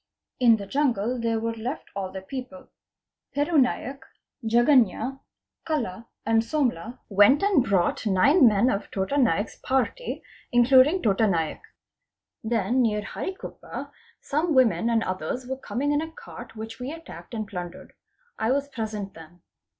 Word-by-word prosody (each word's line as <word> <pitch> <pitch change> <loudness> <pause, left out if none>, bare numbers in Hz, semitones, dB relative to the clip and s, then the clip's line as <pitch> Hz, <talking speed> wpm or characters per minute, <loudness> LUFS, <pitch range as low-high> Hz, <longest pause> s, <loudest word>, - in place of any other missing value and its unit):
In 235 -3 +6
the 200 - -7
jungle 245 -1 0
there 230 -1 0
were 230 +1 -2
left 235 +6 -6
all 190 -2 -3
the 190 -1 -7
people. 270 +5 -8 0.7
Peru 295 +2 +2
Naik, 270 +1 0 0.4
Jaganya, 240 +2 +3 0.4
Kala 230 - -3 0.2
and 225 0 +3
Somla 245 - -1
went 205 - +5
and 390 -10 +4
brought 195 -1 +1
nine 255 - +5
men 220 +4 +3
of 200 - -3
Tota 195 +8 -2
Naik's 230 -6 +1
party 265 - -2 0.3
including 260 +8 +5
Tota 215 +1 +3
Naik. 165 -5 -1 0.8
Then 230 +2 +1
near 210 -3 +1
Harikuppa 375 - -7 0.3
some 310 +2 -1
women 235 -2 +3
and 225 -1 +2
others 185 +7 -3
were 265 +1 -3
coming 275 +2 -2
in 295 +1 +2
a 320 0 -6
cart 240 -7 -11
which 225 +2 -8
we 250 +3 -4
attacked 325 -6 -10
and 215 -2 -3
plundered. 180 -2 -8 0.5
I 220 +2 +1
was 280 +1 -1
present 215 -6 -5
then. 165 +2 -15
235 Hz, 145 wpm, -25 LUFS, 210-275 Hz, 0.8 s, In